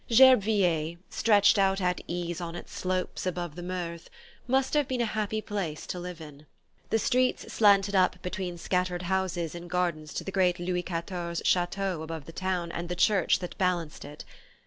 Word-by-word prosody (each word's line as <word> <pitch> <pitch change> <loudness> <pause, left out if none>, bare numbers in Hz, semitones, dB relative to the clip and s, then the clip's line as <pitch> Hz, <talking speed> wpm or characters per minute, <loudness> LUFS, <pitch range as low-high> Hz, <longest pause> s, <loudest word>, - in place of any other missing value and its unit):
Gerbeviller, 200 -10 +5
stretched 205 -2 +4
out 195 0 +3
at 180 -1 0
ease 175 0 -3
on 170 -1 -5
its - - -9
slopes 185 0 -2
above 175 -3 -3
the 175 - -8
Meurthe, 175 -2 -5 0.4
must 265 +1 +1
have 295 -3 +2
been 255 -1 -2
a 235 - +2
happy 215 0 -2
place 185 -8 -4
to 180 - -5
live 180 -1 -7
in. 150 -1 -12 0.4
The 225 - +3
streets 255 +2 +1
slanted 200 -2 +4
up 185 -1 +3
between 180 -1 -4
scattered 180 0 -1
houses 180 -3 -1
in 175 0 -8
gardens 170 -4 -1
to - - -2
the 195 - -5
great 180 -2 +2
Louis 180 0 -1
XIV 170 0 -4
chateau 180 -1 +1
above 160 -2 -6
the 165 - -9
town 180 -1 -2
and 170 +1 -5
the 180 - -2
church 190 0 +3
that 180 - -6
balanced 175 -4 -1
it. 145 +1 -10
180 Hz, 180 wpm, -28 LUFS, 170-195 Hz, 0.4 s, Gerbeviller